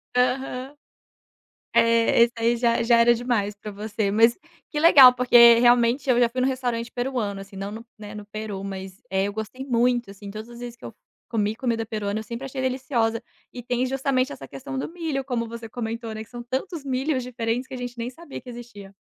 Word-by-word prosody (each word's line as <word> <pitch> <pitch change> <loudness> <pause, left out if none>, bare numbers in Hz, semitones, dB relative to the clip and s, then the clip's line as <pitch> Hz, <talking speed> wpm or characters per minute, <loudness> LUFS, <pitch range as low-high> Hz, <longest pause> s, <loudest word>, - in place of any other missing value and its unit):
Aham. 255 +2 0 1.0
É, 230 0 +4
esse 235 0 +3
aí 230 +1 +1
já 235 -1 +2
já 235 0 +4
era 235 +1 +6
demais 225 -4 -1
pra 210 +1 -8
você. 210 0 -2
Mas 225 +3 +4 0.3
que 295 - -3
legal, 280 -6 +9
porque 240 -1 +7
realmente, 240 +2 +3
eu 245 -1 +4
já 240 - +4
fui 255 +2 -4
num 255 - +2
restaurante 245 -3 -2
peruano, 245 -6 -2
assim, 195 0 -11
não 195 +1 -5
no, 225 +2 -9
né, 210 0 -9
no 210 -1 -8
Peru, 210 -2 -6
mas, 190 -1 -7
eh, 190 0 +1
eu 205 - -4
gostei 220 +5 -6
muito, 240 -3 +1
assim. 200 0 -10
Todas 215 +3 -8
as 240 - -11
vezes 240 -1 -7
que - - -17
eu - - -6
f - - -28 0.3
comi 215 -1 0
comida 230 -3 -1
peruana, 215 -1 -3
eu - - -6
sempre 235 +4 -7
achei 270 0 -5
deliciosa. 250 -3 -1 0.3
E 245 - -8
tem, 245 +1 -1
justamente, 265 0 0
essa - - -9
questão 270 0 -7
do - - -3
milho, 315 -6 -3
como 240 -3 -2
você 230 0 -8
comentou, 230 0 -5
né, 220 - -5
que 220 - -15
são 240 -1 -7
tantos 275 +6 -4
milhos 265 +1 -1
diferentes 240 0 -3
que - - -9
a - - -4
gente 245 0 -6
nem 235 +1 -4
sabia 295 +2 -10
que 250 - -11
existia. 230 -5 -11
235 Hz, 215 wpm, -24 LUFS, 220-255 Hz, 1.0 s, legal